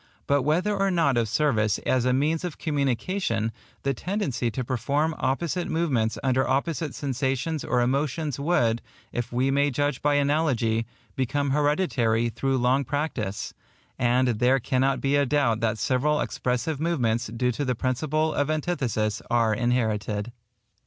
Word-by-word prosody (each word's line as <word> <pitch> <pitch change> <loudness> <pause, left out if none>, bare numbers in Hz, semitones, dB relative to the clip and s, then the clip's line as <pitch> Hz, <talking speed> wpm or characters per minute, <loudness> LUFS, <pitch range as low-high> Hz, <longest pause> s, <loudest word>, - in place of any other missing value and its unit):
But 140 0 +2
whether 175 +9 +1
or 195 0 +1
not 165 -7 +2
of 115 -2 +1
service 110 -6 +2
as 130 -2 +2
a 125 - +3
means 150 +6 +1
of 175 -4 -4
communication, 140 - -1 0.3
the 140 - +1
tendency 140 - -2
to 125 +3 -3
perform 140 +6 0
opposite 170 +6 -1
movements 130 -10 0
under 130 0 +2
opposite 145 +2 -1
sensations 135 +3 -2
or 125 - +1
emotions 140 +3 -1
would, 120 -7 +1 0.3
if 120 -1 -3
we 130 +3 +1
may 140 +1 +3
judge 145 0 -1
by 145 0 +2
analogy, 140 -6 +1 0.3
become 140 +2 0
hereditary 135 -6 +1
through 135 +3 -1
long 130 +3 +2
practice; 120 -8 -3 0.5
and 125 +1 +3
there 130 +2 +4
cannot 130 +2 +1
be 140 +1 +2
a 145 0 +3
doubt 135 -6 +2
that 115 -1 0
several 145 +6 +1
expressive 125 +4 -2
movements 125 -8 0
due 120 +3 0
to 135 +5 -3
the 130 -2 0
principle 155 +6 0
of 145 +1 0
antithesis 130 - -1
are 115 -2 +3
inherited. 110 -2 -1
135 Hz, 150 wpm, -26 LUFS, 120-150 Hz, 0.5 s, there